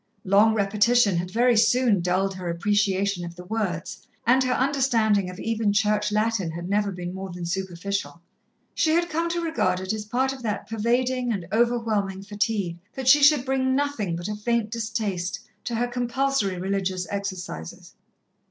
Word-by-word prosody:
Long 205 +3 +5
repetition 210 +1 +3
had 175 +1 -2
very 240 +4 +3
soon 230 -3 +3
dulled 185 +2 0
her 185 -2 -5
appreciation 200 +1 +1
of 170 0 -7
the 180 - -9
words, 195 -5 -4 0.2
and 255 +2 +4
her 255 0 +1
understanding 235 -8 +2
of 180 - -9
even 225 -2 0
Church 210 0 +1
Latin 215 -4 0
had 170 +2 -6
never 205 +1 +1
been 180 -1 -6
more 190 0 -6
than 175 0 -6
superficial. 190 +1 -3 0.5
She 315 - +2
had 345 0 +1
come 330 +2 0
to 345 +1 -1
regard 320 - 0
it 190 +2 -3
as 215 -1 -4
part 260 +5 0
of 265 - -10
that 215 -3 -3
pervading 245 +3 0
and 195 -6 -3
overwhelming 220 -5 0
fatigue, 200 -4 -2 0.2
that 265 -1 -5
she 290 +3 +7
should 285 -2 +5
bring 260 -1 +1
nothing 270 -11 -1
but 175 +2 -5
a 210 - -3
faint 220 0 -1
distaste 215 -5 -2 0.3
to 235 - -2
her 240 +2 0
compulsory 245 -4 0
religious 190 0 -2
exercises. 185 - -6
210 Hz, 170 wpm, -25 LUFS, 190-245 Hz, 0.5 s, she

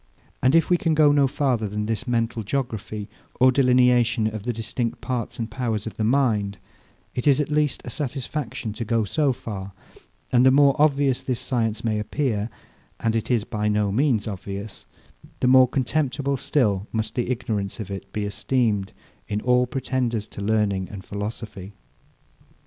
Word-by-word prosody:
And 130 +4 +4
if 165 +1 +3
we 175 - +6
can 165 -2 +1
go 150 -1 +6
no 145 -1 +4
farther 130 -5 0
than 105 +1 -3
this 115 +4 -3
mental 115 -1 0
geography, 110 -3 -3 0.3
or 130 +1 +6
delineation 125 -3 +4
of 110 -1 -2
the 120 +4 -2
distinct 115 +1 -3
parts 125 -4 -3
and 115 - -2
powers 115 -5 -2
of 110 - -7
the 110 - -1
mind, 110 -5 +1 0.6
it 125 - -2
is 140 -1 +5
at 150 0 -1
least 150 -2 +1
a 120 - -5
satisfaction 135 -4 -4
to 115 - -4
go 115 0 +1
so 140 +7 +1
far; 100 -5 -6 0.6
and 125 -1 +5
the 130 - +7
more 140 +1 +5
obvious 140 -3 +3
this 125 -3 -2
science 115 -4 -1
may 110 -2 0
appear 110 -2 -1 0.5
(and 115 -1 0
it 115 - -1
is 120 -4 +2
by 105 -2 -2
no 105 -1 +1
means 120 -1 +2
obvious) 100 +1 -7 0.5
the - - 0
more 130 0 +7
contemptible 140 +1 0
still 110 -7 +1
must 110 -1 -2
the 120 -1 -1
ignorance 110 -5 -2
of 100 -2 -6
it 95 0 -7
be 105 0 -2
esteemed, 105 -1 0 0.3
in 105 -1 -1
all 125 0 +3
pretenders 125 -4 -2
to - - -8
learning 100 -3 0
and 100 -3 -9
philosophy. 105 -1 -6
115 Hz, 170 wpm, -24 LUFS, 105-130 Hz, 0.6 s, the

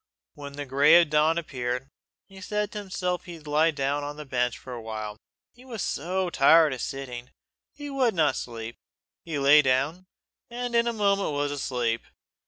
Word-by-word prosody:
When 145 -2 -9
the 145 0 -5
grey 140 +4 +5
of - - +7
the 160 -3 -2
dawn 155 +2 +3
appeared, 125 -5 -3 0.4
he 195 -1 -13
said 210 +1 -2
to 210 - -5
himself 180 -3 -3
he 175 -2 -8
would 155 - -18
lie 150 +2 +3
down 145 -1 -1
on 145 +1 -6
the 150 - -7
bench 125 -3 -1
a 125 -2 -6
while, 110 -2 -6 0.4
he 245 - -18
was 235 -6 -5
so 180 +3 -2
tired 155 +1 +5
of 130 - -5
sitting; 125 -2 -6 0.5
he 290 0 -7
would 255 -6 +1
not 155 -3 +2
sleep. 115 -1 -6 0.5
He 160 -3 -4
lay 140 +2 +7
down, 145 +7 0 0.4
and 245 0 -4
in 235 0 +3
a - - +2
moment 200 -6 +1
was 145 0 -1
asleep. 125 -5 -1
150 Hz, 190 wpm, -26 LUFS, 130-185 Hz, 0.5 s, of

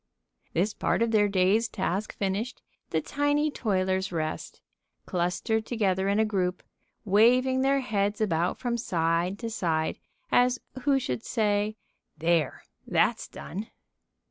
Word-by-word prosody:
This 195 +5 +1
part - - +1
of 230 - 0
their 210 -2 +4
day's 200 +4 +3
task 200 -1 -3
finished, 205 +5 -2 0.3
the 160 - 0
tiny 290 - +1
toilers 190 -5 0
rest, 155 -2 -4 0.5
clustered 185 +5 -1
together 195 -5 +1
in 200 - +2
a 220 - +4
group, 185 -4 -1 0.4
waving 250 +6 +4
their 275 +1 +3
heads 205 -4 0
about 175 -4 +1
from 240 -2 -1
side 170 -1 0
to 230 +1 -4
side, 160 -6 -1 0.3
as 250 0 +4 0.3
who 280 -2 +4
should 125 - -3
say: 210 -2 0 0.4
"There 165 -2 +1 0.2
that's - - +2
done!" 205 +5 -7
205 Hz, 130 wpm, -27 LUFS, 180-230 Hz, 0.5 s, their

